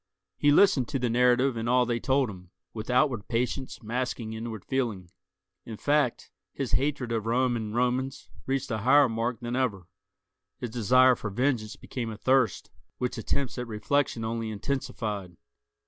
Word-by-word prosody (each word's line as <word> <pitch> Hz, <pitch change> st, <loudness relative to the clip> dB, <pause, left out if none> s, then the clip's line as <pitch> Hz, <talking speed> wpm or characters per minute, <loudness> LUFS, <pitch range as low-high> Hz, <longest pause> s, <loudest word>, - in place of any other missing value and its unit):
He 145 Hz, -, +2 dB
listened 150 Hz, -7 st, +5 dB
to -, -, -2 dB
the 125 Hz, -2 st, -1 dB
narrative 125 Hz, +2 st, +3 dB
and 115 Hz, +1 st, -2 dB
all 125 Hz, 0 st, +4 dB
they 120 Hz, 0 st, -1 dB
told 135 Hz, +1 st, +2 dB
him, 90 Hz, -4 st, -10 dB, 0.2 s
with 110 Hz, +1 st, -6 dB
outward 125 Hz, -4 st, +2 dB
patience 125 Hz, +2 st, -2 dB
masking 115 Hz, -1 st, -3 dB
inward 110 Hz, -2 st, -6 dB
feeling. 110 Hz, -10 st, -2 dB, 0.5 s
In 110 Hz, -2 st, -8 dB
fact, 145 Hz, -2 st, 0 dB, 0.2 s
his 135 Hz, -3 st, -3 dB
hatred 130 Hz, +1 st, 0 dB
of 115 Hz, -1 st, -1 dB
Rome 125 Hz, +1 st, +2 dB
and 110 Hz, -1 st, -4 dB
Romans 125 Hz, +2 st, -1 dB, 0.2 s
reached 135 Hz, 0 st, -1 dB
a 110 Hz, -, -1 dB
higher 135 Hz, +5 st, +5 dB
mark 115 Hz, 0 st, -2 dB
than 120 Hz, 0 st, -3 dB
ever; 110 Hz, -9 st, -1 dB, 0.7 s
his 120 Hz, -, -5 dB
desire 125 Hz, +3 st, +5 dB
for 110 Hz, -, -5 dB
vengeance 115 Hz, 0 st, 0 dB
became 120 Hz, -3 st, -5 dB
a 110 Hz, -, -6 dB
thirst 130 Hz, 0 st, +1 dB, 0.3 s
which 125 Hz, -1 st, -2 dB
attempts 130 Hz, +3 st, -2 dB
at 125 Hz, -, -4 dB
reflection 115 Hz, +2 st, 0 dB
only 115 Hz, 0 st, -2 dB
intensified. 105 Hz, -5 st, -4 dB
120 Hz, 165 wpm, -28 LUFS, 110-130 Hz, 0.7 s, listened